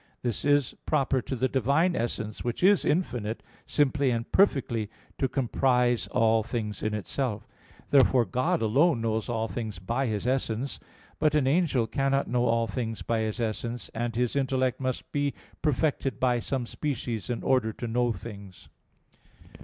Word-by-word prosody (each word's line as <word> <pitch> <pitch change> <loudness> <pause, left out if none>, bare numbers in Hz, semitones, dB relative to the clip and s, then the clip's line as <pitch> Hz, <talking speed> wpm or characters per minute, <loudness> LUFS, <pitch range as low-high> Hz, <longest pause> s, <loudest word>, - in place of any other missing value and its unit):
This 120 -3 -2
is 145 -3 +3
proper 135 -3 +2
to 130 - -4
the 130 +2 +1
Divine 140 +8 +2
essence, 110 -2 -3
which 120 +6 -3
is 200 +1 +5
infinite, 120 - -1 0.2
simply 145 -1 +2
and 115 -1 -2
perfectly 125 - +2 0.3
to 135 - +2
comprise 125 -1 +1
all 115 -2 +3
things 105 -2 -4
in 110 0 -1
Itself. 105 +1 -3 0.4
Therefore 130 -3 +5
God 120 +3 0
alone 135 +4 +3
knows 110 0 -1
all 115 -1 -1
things 110 -4 -5
by 115 +9 -1
His 105 -1 -2
essence. 130 0 -1 0.4
But 150 0 +3
an 150 -3 +3
angel 140 -4 +2
cannot 135 +3 0
know 125 0 +1
all 115 0 +2
things 115 +1 -4
by 115 -1 0
his 110 +2 -2
essence; 115 +1 -3
and 115 +1 -3
his 125 +1 0
intellect 130 -2 +1
must 130 -1 -3
be 145 -1 0 0.3
perfected 140 -4 0
by 125 -2 +2
some 130 +1 -2
species 120 - -3
in 120 - -2
order 125 -4 +2
to 120 - -5
know 120 +1 +1
things. 100 -5 -9
125 Hz, 160 wpm, -28 LUFS, 115-135 Hz, 0.4 s, is